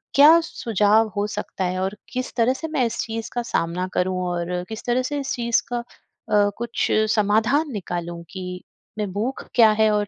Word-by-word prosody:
क्या 305 +4 +8
सुझाव 220 - +2
हो 205 0 0
सकता 210 -2 -4
है 185 +1 -1
और 190 +2 -2 0.2
किस 255 0 -3
तरह 240 +2 +3
से 320 +4 -5
मैं 275 -6 +1
इस 230 - -3
चीज़ 225 0 -4
का 240 - -1
सामना 180 -4 -1
करूँ 185 0 0
और 175 0 -2
किस 220 0 -6
तरह 245 +1 +2
से 290 -1 -2
इस 275 - -2
चीज़ 235 -1 +1
का 245 - -2
अ, - - -6 0.7
कुछ 235 0 -1 0.3
समाधान 225 +9 +2
निकालूँ 175 -3 -4
कि 180 -1 -6 0.4
मैं 205 -3 -2
भूख 235 +6 -3
क्या 225 -3 +7
है 220 0 +5
और 210 -1 +1
220 Hz, 190 wpm, -23 LUFS, 185-245 Hz, 0.7 s, क्या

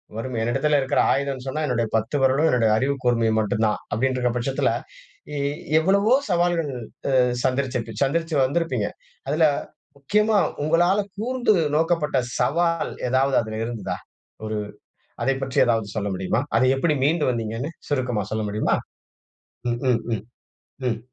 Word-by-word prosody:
வறுமை, 120 +2 -4
என்னிடத்தில 145 +5 +2
இருக்கிற 135 - 0
ஆயுதம்னு 135 -2 -1
சொன்னா 155 +4 -2
என்னுடைய 120 -4 0
10 110 +5 0
விரலும், 135 +4 +4
என்னுடைய 120 -5 +3
அறிவுக்கூர்மையும் 120 -4 +1
மட்டும்தான். 105 0 0
அப்டின்னுருக்கிற 125 +1 +1
பட்சத்துல, 130 +3 0 0.7
எ - - -2 0.4
எவ்வளவோ 200 +7 +3 0.2
சவால்கள் 175 -3 +1 0.5
அ - - +6 0.2
சந்திச்சிருச்சுப் 125 -4 -1
சந்திச்சு 165 +4 -1
வந்திருப்பீங்க. 130 -7 0 0.4
அதுல 155 +3 +3 0.5
முக்கியமா 210 +10 +2 0.3
உங்களால 175 +6 +3 0.2
கூர்ந்து 245 +1 +1 0.2
நோக்கப்பட்ட 160 -3 +1 0.2
சவால் 165 +6 +1 0.2
ஏதாவது 135 +2 +2
அதுல 110 -1 -5
இருந்ததா? 115 -2 -4 0.5
ஒரு 110 0 -2 0.7
அதைப் 135 0 +1
பற்றி 135 -1 -2
ஏதாவது 115 -3 +1
சொல்ல 100 -1 -1
முடியுமா? 95 +5 0 0.2
அத - - +3
எப்படி 150 +3 +1
மீண்டு 155 +2 +2
வந்தீங்கன்னு 115 +4 -3 0.2
சுருக்கமா 125 -7 0
சொல்ல 110 0 -1
முடியுமா? 105 +1 +1 1.0
ம், 120 - -2
ம், 115 -2 +1
ம், 105 - -6 0.7
ம். 115 -2 -1
130 Hz, 130 wpm, -23 LUFS, 115-155 Hz, 1.0 s, அ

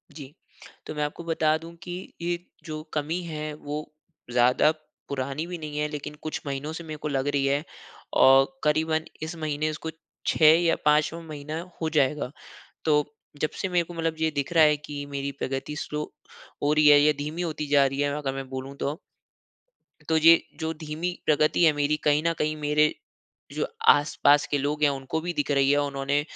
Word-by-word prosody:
जी। 145 -2 -10 0.5
तो - - -5
मैं 150 - -1
आपको 150 +3 -4
बता 160 -1 +2
दूँ 165 +1 -11
कि 180 - -7 0.3
ये 175 0 0 0.3
जो 155 -1 -5
कमी 155 +4 -1
है 155 -2 -5
वो 150 0 -5 0.5
ज़्यादा 125 +5 +4 0.4
पुरानी 140 +3 -3
भी 180 -1 -5
नहीं 150 -2 -6
है 150 - +1
लेकिन 150 0 -6
कुछ 155 - -4
महीनों 140 +2 -3
से 170 - -6
मेरे 155 -1 -7
को 150 - -4
लग 135 -1 -1
रही 140 -1 +1
है। 140 +2 +1 0.6
और 135 +1 +7 0.2
करीबन 155 +1 +1 0.2
इस 160 +2 -4
महीने 155 0 -1
उसको 155 +1 -5 0.4
6 155 0 +6
या 165 -1 +3
5वा 150 +2 +3
महीना 155 0 -6 0.2
हो 160 - 0
जाएगा। 140 -1 +1 0.5
तो 150 -2 +3 0.4
जब 155 - +1
से 190 - -1
मेरे 175 -1 +2
को 175 - -10
मतलब 165 -1 -1
ये 160 0 +2
दिख 140 +4 -2
रहा 160 -2 +7
है 150 -1 +4
कि 145 -1 -7
मेरी 140 0 -3
प्रगति 135 +3 -3
स्लो 150 0 -3 0.6
हो 145 +1 +3
रही 155 -1 +5
है 145 0 +8
या 150 +1 +5
धीमी 155 +4 -3
होती 155 -3 -3
जा 140 -1 +5
रही 135 +1 -2
है 145 0 +1
अगर 135 -2 -2
मैं 135 -1 -6
बोलूँ 130 +1 -6
तो 150 +6 -3 1.1
तो 160 - +4
ये 165 +1 +7 0.2
जो 160 0 -2
धीमी 155 +3 -4
प्रगति 155 +3 +3
है 160 - +7
मेरी 145 +1 +1
कहीं 150 0 +3
न - - +3
कहीं 155 0 0
मेरे 150 0 +2 0.6
जो - - -1 0.2
आस-पास 145 0 +5
के 145 - 0
लोग 145 +2 -2
हैं 145 - +5
उनको 140 +3 -3
भी 175 +2 -3
दिख 145 0 -1
रही 140 -1 +3
है। 145 - +5
उन्होंने 140 0 0
150 Hz, 195 wpm, -26 LUFS, 145-160 Hz, 1.1 s, है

